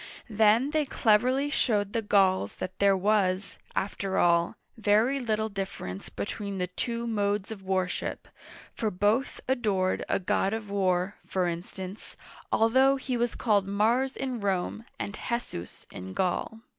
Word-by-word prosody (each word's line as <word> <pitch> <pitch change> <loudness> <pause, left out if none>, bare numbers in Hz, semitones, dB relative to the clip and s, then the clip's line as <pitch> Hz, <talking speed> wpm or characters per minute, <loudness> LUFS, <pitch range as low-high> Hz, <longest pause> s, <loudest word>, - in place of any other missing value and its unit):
Then 220 +6 +4
they 310 0 +2
cleverly 255 +5 +2
showed 205 -8 +1
the 230 - +1
Gauls 190 - +2
that 185 - -6
there 200 -1 +4
was, 195 -1 +1 0.2
after 195 0 -2
all, 170 -1 +3 0.2
very 220 +5 +3
little 220 -3 0
difference 190 - -5
between 200 - -4
the 180 - 0
two 235 +6 -3
modes 205 -2 -1
of 210 -3 -7
worship, 185 -1 -2 0.5
for 220 - -1
both 210 +7 0
adored 205 -8 +1
a - - +2
god 195 +1 0
of 210 -2 -6
war, 185 0 +1
for 185 -1 0
instance, 185 +3 -6 0.3
although 260 +5 +4
he 260 -1 -3
was 240 0 0
called 205 -4 +2
Mars 230 +7 +1
in 260 -3 -3
Rome 200 +2 -1
and 200 - -4
He'sus 235 - -5
in 95 +1 -7
Gaul. 190 +4 -1
205 Hz, 145 wpm, -28 LUFS, 190-230 Hz, 0.5 s, Then